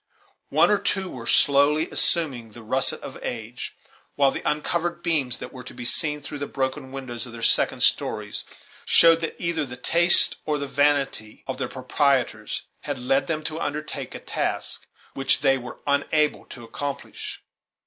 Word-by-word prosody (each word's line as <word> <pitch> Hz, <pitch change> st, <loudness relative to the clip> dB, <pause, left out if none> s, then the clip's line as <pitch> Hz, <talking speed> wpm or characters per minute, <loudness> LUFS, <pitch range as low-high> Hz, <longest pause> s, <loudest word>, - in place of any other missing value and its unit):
One 160 Hz, +6 st, +4 dB
or 205 Hz, -, +3 dB
two 190 Hz, -2 st, -2 dB
were 115 Hz, -2 st, -8 dB
slowly 145 Hz, +3 st, +4 dB
assuming 130 Hz, -10 st, -1 dB
the 120 Hz, -, -12 dB
russet 130 Hz, +5 st, +1 dB
of -, -, -9 dB
age; 120 Hz, +1 st, -6 dB, 0.4 s
while 140 Hz, -1 st, +3 dB
the -, -, -5 dB
uncovered 170 Hz, +3 st, -2 dB
beams 140 Hz, -7 st, 0 dB
that 125 Hz, -, -9 dB
were 130 Hz, -1 st, -9 dB
to -, -, -11 dB
be 120 Hz, -, -7 dB
seen 150 Hz, +4 st, +2 dB
through 145 Hz, +1 st, -7 dB
the 145 Hz, -, -4 dB
broken 130 Hz, 0 st, -3 dB
windows 130 Hz, -3 st, -5 dB
of 120 Hz, -, -11 dB
their 115 Hz, -1 st, -8 dB
second -, -, +3 dB
stories -, -, 0 dB, 0.4 s
showed 165 Hz, 0 st, +5 dB
that 165 Hz, -, -3 dB
either 170 Hz, -2 st, -1 dB
the 125 Hz, -3 st, -8 dB
taste 170 Hz, +7 st, +7 dB
or 150 Hz, -1 st, -1 dB
the 140 Hz, -, -3 dB
vanity 140 Hz, -6 st, 0 dB
of 130 Hz, -, -5 dB
their -, -, -2 dB
proprietors 130 Hz, -4 st, 0 dB, 0.2 s
had 145 Hz, -2 st, -5 dB
led 130 Hz, +2 st, 0 dB
them 155 Hz, -2 st, -2 dB
to 155 Hz, +1 st, -4 dB
undertake 150 Hz, +1 st, -4 dB
a -, -, -6 dB
task -, -, -3 dB, 0.3 s
which 135 Hz, 0 st, +2 dB
they 135 Hz, -2 st, +4 dB
were 125 Hz, -2 st, -8 dB
unable 150 Hz, +1 st, +1 dB
to 120 Hz, -, -11 dB
accomplish. 140 Hz, +4 st, -6 dB
140 Hz, 170 wpm, -24 LUFS, 125-155 Hz, 0.4 s, taste